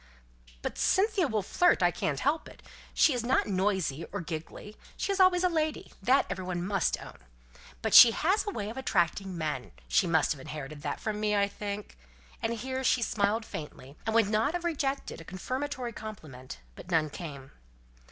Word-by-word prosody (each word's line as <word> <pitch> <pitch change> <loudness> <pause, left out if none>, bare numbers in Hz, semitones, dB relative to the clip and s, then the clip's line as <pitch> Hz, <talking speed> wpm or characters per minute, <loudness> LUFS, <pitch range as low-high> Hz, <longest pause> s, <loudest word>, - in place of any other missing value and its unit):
"But - - -4
Cynthia 390 -3 +2
will 215 -5 -1
flirt, 350 - +3
and - - +7
I - - 0
can't 145 -4 -2
help 300 +4 0
it. - - -16 0.3
She 300 - +4
is 245 -2 -2
not 255 +2 +2
noisy, 190 -6 0
or 200 - -3
giggling; 165 +4 -7 0.2
she - - -1
is 395 - -1
always 370 -1 +5
a - - +5
lady 315 -3 -2
that 255 +7 +4
everybody 185 -2 -3
must 190 +1 0
own. - - -11 0.6
But - - -1
she 240 - +12
has 375 - +1
a - - +1
way 210 - -4
of 235 - -10
attracting 190 -5 0
men, 150 -6 -3 0.2
she 60 - +3
must 160 -2 +2
have 145 -4 -3
inherited 145 +1 -7
from 215 -1 -3
me, 210 0 +1
I 200 0 +3
think." 205 - -6 0.4
And 225 - 0
here 260 +3 -4
she 250 -2 +3
smiled 215 +1 0
faintly, 145 -5 -8
and 220 - 0
would 225 -3 +5
not 225 +9 +1
have 350 - -3
rejected 280 - -2
a - - -9
confirmatory 255 - -4
compliment, 155 -14 -9
but - - -12
none 160 -3 +1
came. 140 -7 -8
210 Hz, 185 wpm, -29 LUFS, 170-265 Hz, 0.6 s, she